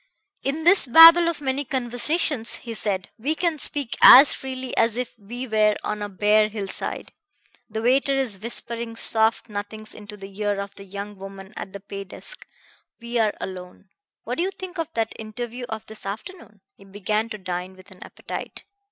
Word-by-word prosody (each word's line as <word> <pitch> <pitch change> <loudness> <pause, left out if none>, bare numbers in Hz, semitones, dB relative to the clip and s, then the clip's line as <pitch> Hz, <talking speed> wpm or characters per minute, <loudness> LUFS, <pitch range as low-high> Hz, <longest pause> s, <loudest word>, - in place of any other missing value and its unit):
"In 290 +4 -2
this 360 -3 +6
babble 330 +6 +9
of 330 -3 -5
many 270 0 -1
conversations," 260 0 -1
he 235 - -8
said, 195 -4 -3
"we 290 +8 -1
can 335 -2 -1
speak 280 -5 -2
as 270 +3 +10
freely 260 -1 -6
as 230 0 +2
if 250 -1 -3
we 240 +5 -7
were 215 -2 +3
on 210 0 -3
a 205 - -4
bare 210 +2 +3
hill 205 -2 -5
side. - - -4 0.6
The 220 +1 -4
waiter 270 +3 +3
is 250 -8 -1
whispering 235 0 -3
soft 225 0 +2
nothings 215 +1 -7
into 210 0 -11
the 195 -1 -11
ear 205 -1 0
of 200 0 -6
the 195 - -11
young 200 +1 -7
woman 195 0 -10
at 195 - -7
the 200 - -8
pay 200 0 -8
desk. 485 - -7 0.5
We 235 0 -3
are 215 -2 +1
alone. 185 +1 -8 0.3
What - - -4
do - - +2
you 375 - 0
think 375 -2 -8
of 325 - -1
that 225 -1 -1
interview 240 +3 -6
of 220 -1 -6
this 220 0 -9
afternoon?" 215 - -8
He - - -19
began 210 +3 -2
to 215 - -6
dine 185 -1 -5
with 185 +1 -17
an 185 - -16
appetite. - - -8
220 Hz, 185 wpm, -23 LUFS, 200-260 Hz, 0.6 s, as